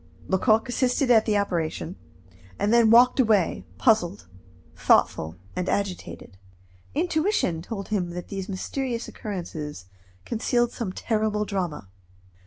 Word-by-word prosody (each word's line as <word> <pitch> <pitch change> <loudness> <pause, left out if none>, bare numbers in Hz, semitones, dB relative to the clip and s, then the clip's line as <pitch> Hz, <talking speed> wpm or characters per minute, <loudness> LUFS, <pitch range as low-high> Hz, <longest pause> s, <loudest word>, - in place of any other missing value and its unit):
Lecoq 215 +5 +2
assisted 250 +1 +1
at 220 -2 +5
this 215 - +2
operation, 175 -3 -1 0.6
and 210 +2 +1
then 235 -2 +5
walked 245 +4 +6
away, 210 - +2
puzzled, 205 -4 +2 0.5
thoughtful, 80 +1 +2 0.2
and 180 0 -2
agitated. 190 - -4 0.6
Intuition 315 - +1
told 195 +2 -6
him 190 -5 -1
that 175 0 -7
these 195 -1 -5
mysterious 235 +5 -3
occurrences 160 - -6 0.4
concealed 240 +1 0
some 230 -6 -4
terrible 215 0 -1
drama. 180 - -3
210 Hz, 115 wpm, -25 LUFS, 180-235 Hz, 0.6 s, walked